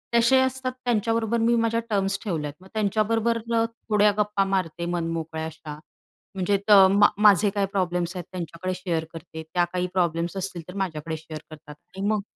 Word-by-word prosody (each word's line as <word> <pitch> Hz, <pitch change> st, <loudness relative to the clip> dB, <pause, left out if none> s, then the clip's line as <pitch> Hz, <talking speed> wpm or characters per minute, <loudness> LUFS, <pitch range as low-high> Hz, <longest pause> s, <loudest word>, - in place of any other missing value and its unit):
तसे 235 Hz, +3 st, +5 dB
असतात. 260 Hz, 0 st, -1 dB
त्यांच्याबरोबर 230 Hz, 0 st, +1 dB
मी 235 Hz, +1 st, +3 dB
माझ्या 230 Hz, 0 st, +1 dB
टर्म्स 195 Hz, -1 st, 0 dB
ठेवल्यात. 155 Hz, -8 st, -3 dB
मग 190 Hz, -, -15 dB
त्यांच्याबरोबर 220 Hz, +2 st, +1 dB
थोड्या 225 Hz, -2 st, +2 dB
गप्पा 210 Hz, -1 st, +1 dB
मारते 175 Hz, -3 st, -1 dB
मनमोकळ्या 165 Hz, -2 st, -3 dB
अशा. 150 Hz, -2 st, -8 dB, 0.6 s
म्हणजे 190 Hz, +2 st, +1 dB
त -, -, +5 dB
अ, 195 Hz, -2 st, +9 dB
मा 200 Hz, +2 st, +5 dB
माझे 210 Hz, -1 st, +5 dB
काही 200 Hz, 0 st, 0 dB
प्रॉब्लेम्स 180 Hz, -2 st, -1 dB
आहेत, 180 Hz, -2 st, -5 dB
त्यांच्याकडे 180 Hz, +1 st, -4 dB
शेअर 170 Hz, -3 st, -2 dB
करते. 160 Hz, -1 st, -8 dB
त्या 175 Hz, -1 st, +3 dB
काही 180 Hz, 0 st, 0 dB
प्रॉब्लेम्स 170 Hz, 0 st, 0 dB
असतील 185 Hz, -2 st, -4 dB
तर 180 Hz, -, -9 dB
माझ्याकडे 160 Hz, -2 st, -4 dB
शेअर 155 Hz, 0 st, -8 dB
करतात. 150 Hz, -1 st, -12 dB, 0.2 s
आणि 195 Hz, +1 st, -1 dB
मग 215 Hz, -1 st, +1 dB
190 Hz, 170 wpm, -25 LUFS, 170-215 Hz, 0.6 s, अ